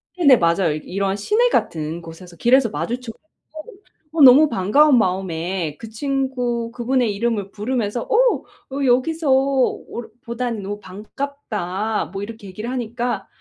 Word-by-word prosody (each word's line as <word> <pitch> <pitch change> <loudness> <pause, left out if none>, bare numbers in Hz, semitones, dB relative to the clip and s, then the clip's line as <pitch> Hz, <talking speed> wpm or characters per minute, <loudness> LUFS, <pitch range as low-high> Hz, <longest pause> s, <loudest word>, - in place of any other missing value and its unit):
네네, 280 -9 +6
맞아요. 170 -1 +2
이 150 - -3
이런 195 +1 -2
시내 435 - +2
같은 160 - -1
곳에서 170 +1 -12
길에서 250 0 +4
마주쳐 225 +10 -4
갖고 310 +7 -26 0.9
어 320 - +1
너무 275 +4 +8
반가운 250 +8 +4
마음에 180 -5 -1
그 225 - -8
친구 245 -2 -2
그분의 245 -2 0
이름을 210 -3 -1
부르면서 215 0 -2
어 - - +2 0.3
"어 280 0 -1
여기서 270 +4 +2
어 265 -1 +2 0.5
보다니 235 -1 -3
너무 205 +1 -5
반갑다." 210 -2 -4
뭐 195 +1 -5
이렇게 220 -1 -9
얘기를 210 +5 -6
하니까 240 0 -3
230 Hz, 310 characters per minute, -21 LUFS, 195-265 Hz, 0.9 s, 너무